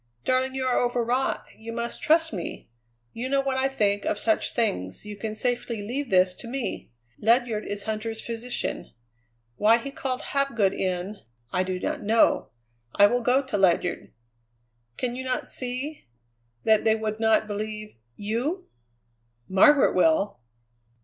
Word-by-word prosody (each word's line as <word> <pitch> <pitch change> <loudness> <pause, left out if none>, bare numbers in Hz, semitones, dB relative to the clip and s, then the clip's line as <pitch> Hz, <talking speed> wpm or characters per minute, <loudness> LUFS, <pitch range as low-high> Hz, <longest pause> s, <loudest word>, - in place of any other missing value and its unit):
"Darling, 260 +1 +1
you 260 -1 -1
are 255 - +2
overwrought. 245 +1 0
You 225 +1 -8
must 235 0 -4
trust 320 -2 +3
me. 175 - -6 0.4
You 250 +3 -4
know 275 0 +2
what 270 -1 0
I 265 +1 +2
think 205 -6 0
of - - 0
such 220 +1 0
things; 95 - -1
you 210 0 -6
can 215 +1 -5
safely 240 -2 -2
leave 260 +5 -3
this 185 -1 +4
to - - -9
me. 255 0 -4 0.3
Ledyard 230 -1 +2
is 205 0 -4
Huntter's 220 +1 -3
physician. 235 +1 -4 0.6
Why 220 +2 +5
he 275 +4 -6
called 265 -4 -3
Hapgood 235 -9 +2
in, 185 +2 -2 0.3
I - - +1
do 185 0 -3
not - - -2
know. 220 +2 +3 0.5
I 205 - +7
will 245 +4 +2
go 250 +3 +3
to 210 -6 -2
Ledyard. 180 -1 +1 0.9
Can 245 -1 -2
you 260 - -4
not 255 -1 -2
see 255 - -3 0.6
that 220 -1 +4
they 220 0 +4
would 220 -1 -3
not 220 -1 +3
believe 215 0 -5 0.2
you?" 250 - -2 0.8
"Margaret 265 +10 +5
will!" 180 +1 +2
230 Hz, 150 wpm, -26 LUFS, 205-255 Hz, 0.9 s, I